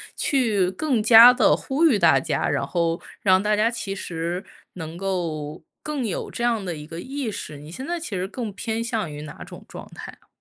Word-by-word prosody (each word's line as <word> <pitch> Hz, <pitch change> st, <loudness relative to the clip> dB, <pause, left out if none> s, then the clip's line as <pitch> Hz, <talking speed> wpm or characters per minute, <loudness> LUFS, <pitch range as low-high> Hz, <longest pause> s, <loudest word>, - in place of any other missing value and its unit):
去 215 Hz, -, +1 dB
更 265 Hz, -4 st, 0 dB
加 230 Hz, +2 st, +10 dB
地 255 Hz, -, +4 dB
呼 290 Hz, +5 st, 0 dB
吁 240 Hz, -10 st, +4 dB
大 -, -, +5 dB
家， -, -, -1 dB
然 -, -, 0 dB
后 170 Hz, -1 st, -1 dB, 0.2 s
让 190 Hz, -1 st, +4 dB
大 210 Hz, 0 st, +2 dB
家 215 Hz, +2 st, +3 dB
其 230 Hz, -4 st, -4 dB
实 175 Hz, -1 st, -4 dB, 0.3 s
能 160 Hz, -2 st, -7 dB
够 165 Hz, -6 st, -3 dB, 0.2 s
更 295 Hz, -4 st, -3 dB
有 200 Hz, -, -3 dB
这 235 Hz, -, -5 dB
样 230 Hz, -3 st, +1 dB
的 175 Hz, -2 st, -3 dB
一 150 Hz, -1 st, -9 dB
个 165 Hz, +2 st, -8 dB
意 265 Hz, 0 st, -4 dB
识， 155 Hz, -6 st, -7 dB
你 150 Hz, +2 st, -11 dB
现 260 Hz, -, -7 dB
在 345 Hz, 0 st, -1 dB
其 335 Hz, -, -7 dB
实 185 Hz, -2 st, -3 dB
更 225 Hz, +1 st, -5 dB
偏 225 Hz, +3 st, -3 dB
向 225 Hz, -7 st, -2 dB
于 145 Hz, 0 st, -7 dB
哪 150 Hz, -1 st, -9 dB
种 -, -, -12 dB
状 -, -, -10 dB
态 -, -, -8 dB
啊？ -, -, -30 dB
205 Hz, 230 characters per minute, -23 LUFS, 170-240 Hz, 0.3 s, 加